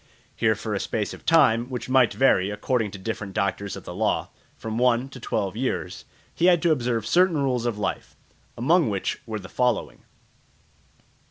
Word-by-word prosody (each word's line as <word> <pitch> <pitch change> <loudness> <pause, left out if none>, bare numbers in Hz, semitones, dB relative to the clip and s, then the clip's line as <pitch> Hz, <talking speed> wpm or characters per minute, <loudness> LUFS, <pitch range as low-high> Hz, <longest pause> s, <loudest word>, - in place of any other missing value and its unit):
Here - - +2
for - - -5
a - - -1
space - - -2
of - - -13
time, 125 -7 +4
which 125 -3 -5
might 130 -2 +4
vary, 100 -8 +3
according 105 +2 -1
to 100 - -9
different 100 -1 -5
doctors 100 +1 -1
of - - -9
the - - -8
law, - - 0 0.3
from 110 +1 -4
one 125 +1 +2
to 135 - -11
twelve 100 -4 -2
years, 110 -7 -3 0.3
he 170 - 0
had 175 -2 +5
to 170 - +4
observe 120 -6 0
certain 175 +5 +3
rules 125 -4 0
of 115 -3 -2
life, 100 -2 -4 0.4
among 155 +3 +3
which 100 -2 -2
were 110 -1 -3
the 95 -3 -9
following. 125 0 -1
120 Hz, 180 wpm, -24 LUFS, 105-130 Hz, 0.4 s, had